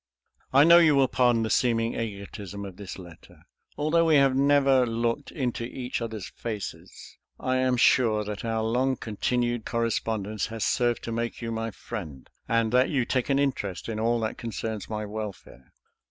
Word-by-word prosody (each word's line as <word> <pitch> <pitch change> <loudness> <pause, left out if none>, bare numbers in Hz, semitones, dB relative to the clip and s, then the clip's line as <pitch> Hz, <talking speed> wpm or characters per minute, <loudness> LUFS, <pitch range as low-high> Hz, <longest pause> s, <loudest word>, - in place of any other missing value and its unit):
I 140 +2 +6
know 170 +2 +8
you 155 -4 +5
will 135 -1 +4
pardon 120 -3 +2
the 110 - -2
seeming 115 -2 +2
egotism 100 -2 -6
of 95 -2 -9
this 100 -3 -8
letter. 85 -3 -14 0.3
Although 160 +3 +2
we 160 - +5
have 135 -2 +4
never 135 -1 +4
looked 115 +4 -1
into 125 -5 -2
each 125 +1 -4
other's 110 -4 -5
faces, 110 -4 -7 0.2
I 130 0 0
am 130 -1 +2
sure 115 -3 +4
that 105 -1 -6
our 115 -1 -1
long 125 +4 +1
continued 120 +2 -1
correspondence 110 -3 -2
has 115 -2 -3
served 120 -1 +1
to 115 - -4
make 115 +1 -3
you 115 -1 -4
my 115 0 -2
friend, 75 -9 -8 0.2
and 115 -1 +1
that 125 +2 +4
you 130 -5 +1
take 130 +1 -1
an 135 - +3
interest 130 -10 -1
in 110 -2 -3
all 115 +1 +1
that 110 - -3
concerns 110 -3 -5
my 105 -1 -3
welfare. 105 -12 -8
115 Hz, 175 wpm, -26 LUFS, 110-130 Hz, 0.3 s, know